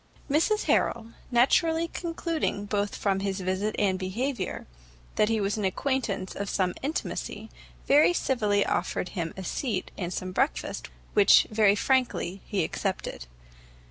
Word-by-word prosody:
Mrs 350 Hz, +9 st, +2 dB
Harrel, 230 Hz, -1 st, +1 dB, 0.2 s
naturally 320 Hz, +7 st, +3 dB
concluding 330 Hz, -, -2 dB
both 205 Hz, 0 st, -1 dB
from 195 Hz, -2 st, 0 dB
his 195 Hz, 0 st, -2 dB
visit 190 Hz, +3 st, -1 dB
and 190 Hz, -2 st, +1 dB
behaviour, 205 Hz, +3 st, -3 dB, 0.5 s
that 210 Hz, -, +3 dB
he 225 Hz, -1 st, +1 dB
was 200 Hz, +1 st, 0 dB
an -, -, -2 dB
acquaintance 200 Hz, -2 st, -1 dB
of 200 Hz, 0 st, -3 dB
some 185 Hz, -2 st, 0 dB
intimacy, 295 Hz, +4 st, -4 dB, 0.3 s
very 295 Hz, +5 st, +6 dB
civilly 210 Hz, -11 st, +1 dB
offered 180 Hz, -, -1 dB
him 170 Hz, -4 st, -3 dB
a 190 Hz, -, -5 dB
seat 210 Hz, -1 st, -2 dB
and 175 Hz, -2 st, -3 dB
some 185 Hz, 0 st, -4 dB
breakfast, 270 Hz, +10 st, -1 dB, 0.2 s
which, 205 Hz, -1 st, +7 dB
very 210 Hz, -2 st, +4 dB
frankly, 210 Hz, -6 st, 0 dB
he 200 Hz, -5 st, 0 dB
accepted. 185 Hz, -, -3 dB
205 Hz, 140 wpm, -27 LUFS, 190-265 Hz, 0.5 s, which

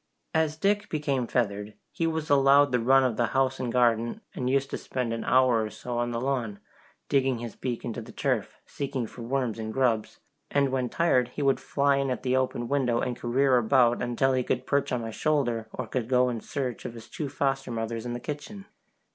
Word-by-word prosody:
As 160 Hz, -1 st, +1 dB
Dick 205 Hz, +4 st, +1 dB
became 140 Hz, -5 st, -1 dB
feathered, 105 Hz, -3 st, -1 dB, 0.2 s
he 165 Hz, -, -1 dB
was 160 Hz, -1 st, -2 dB
allowed 140 Hz, 0 st, +5 dB
the 125 Hz, -, +2 dB
run 135 Hz, +3 st, +5 dB
of 125 Hz, -4 st, 0 dB
the 120 Hz, -, +2 dB
house 135 Hz, 0 st, +2 dB
and 125 Hz, -2 st, -2 dB
garden, 120 Hz, -, +2 dB
and 125 Hz, -3 st, -2 dB
used 135 Hz, +1 st, +1 dB
to -, -, -2 dB
spend 125 Hz, -3 st, -3 dB
an 115 Hz, -, -3 dB
hour 125 Hz, -3 st, +4 dB
or 110 Hz, -, -3 dB
so 120 Hz, +2 st, -5 dB
on 120 Hz, 0 st, 0 dB
the 120 Hz, -1 st, -2 dB
lawn, 120 Hz, -5 st, -2 dB, 0.5 s
digging 135 Hz, -2 st, +2 dB
his 115 Hz, -1 st, -7 dB
beak 125 Hz, -3 st, -4 dB
into 120 Hz, 0 st, -4 dB
the 110 Hz, -, -11 dB
turf, -, -, -1 dB
seeking 135 Hz, -3 st, -3 dB
for 120 Hz, -, -10 dB
worms 120 Hz, -2 st, -1 dB
and 110 Hz, 0 st, -4 dB
grubs, 115 Hz, -3 st, 0 dB, 0.3 s
and 140 Hz, -1 st, +2 dB
when 130 Hz, -2 st, 0 dB
tired 130 Hz, -8 st, +2 dB
he 145 Hz, -, -2 dB
would 135 Hz, -1 st, +3 dB
fly 140 Hz, 0 st, +1 dB
in 140 Hz, -1 st, 0 dB
at 125 Hz, -, -3 dB
the 130 Hz, 0 st, +1 dB
open 125 Hz, -2 st, 0 dB
window 125 Hz, -4 st, +1 dB
and 125 Hz, -, -1 dB
career 130 Hz, +2 st, +2 dB
about 120 Hz, 0 st, +3 dB
until 125 Hz, +2 st, +1 dB
he 130 Hz, -, +2 dB
could 125 Hz, +1 st, -1 dB
perch 140 Hz, -1 st, 0 dB
on 125 Hz, -2 st, 0 dB
my 115 Hz, -, -4 dB
shoulder, 120 Hz, -5 st, 0 dB
or 130 Hz, -, -4 dB
go 125 Hz, +1 st, +1 dB
in 115 Hz, -3 st, -3 dB
search 130 Hz, -1 st, -4 dB
of 120 Hz, -, -6 dB
his 115 Hz, -1 st, -10 dB
two 140 Hz, +5 st, -5 dB
foster 135 Hz, 0 st, -1 dB
mothers 115 Hz, -1 st, -3 dB
in 120 Hz, -1 st, -4 dB
the 120 Hz, -, -4 dB
kitchen. 150 Hz, -, -7 dB
125 Hz, 215 wpm, -27 LUFS, 120-140 Hz, 0.5 s, allowed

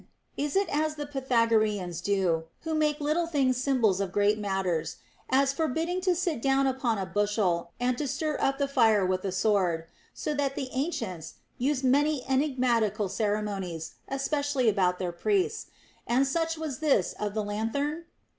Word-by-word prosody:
Is 290 Hz, 0 st, -2 dB
it 395 Hz, +1 st, +3 dB
as 305 Hz, 0 st, 0 dB
the 295 Hz, -1 st, -4 dB
Pythagoreans 225 Hz, -, +1 dB
do, 180 Hz, -5 st, +1 dB, 0.2 s
who 320 Hz, -1 st, -3 dB
make 305 Hz, -1 st, +1 dB
little 310 Hz, +3 st, 0 dB
things 270 Hz, -6 st, +1 dB
symbols 245 Hz, -7 st, +2 dB
of 195 Hz, -2 st, -2 dB
great 205 Hz, +2 st, +2 dB
matters, 190 Hz, -5 st, -1 dB, 0.2 s
— -, -, -35 dB
as 275 Hz, +1 st, +3 dB
forbidding 325 Hz, +5 st, -1 dB
to 365 Hz, -1 st, +2 dB
sit 340 Hz, -, -1 dB
down 270 Hz, +1 st, +3 dB
upon 255 Hz, -4 st, 0 dB
a 195 Hz, -, -2 dB
bushel 190 Hz, -3 st, 0 dB
and 250 Hz, 0 st, +1 dB
to 295 Hz, -, -1 dB
stir 300 Hz, +3 st, -1 dB
up 270 Hz, 0 st, +1 dB
the 280 Hz, -1 st, 0 dB
fire 225 Hz, -7 st, +4 dB
with 185 Hz, 0 st, 0 dB
a 195 Hz, -, -1 dB
sword, 185 Hz, -4 st, +1 dB, 0.2 s
— -, -, -31 dB
so 300 Hz, -, -2 dB
that 280 Hz, -2 st, -1 dB
the 260 Hz, -, -3 dB
ancients 225 Hz, -, -3 dB, 0.2 s
used 270 Hz, +1 st, 0 dB
many 285 Hz, +1 st, +2 dB
enigmatical 245 Hz, -7 st, +1 dB
ceremonies, 200 Hz, -6 st, -2 dB, 0.2 s
espec 285 Hz, +1 st, -1 dB
ially 255 Hz, -3 st, +2 dB
about 185 Hz, -4 st, +2 dB
their 180 Hz, -1 st, -2 dB
priests, 410 Hz, -, 0 dB, 0.4 s
and 255 Hz, +3 st, +3 dB
such 325 Hz, +3 st, -1 dB
was 310 Hz, -5 st, -4 dB
this 285 Hz, -, +2 dB
of 210 Hz, 0 st, -3 dB
the 215 Hz, -, 0 dB
lanthorn? 280 Hz, +10 st, -2 dB
255 Hz, 175 wpm, -28 LUFS, 205-290 Hz, 0.4 s, fire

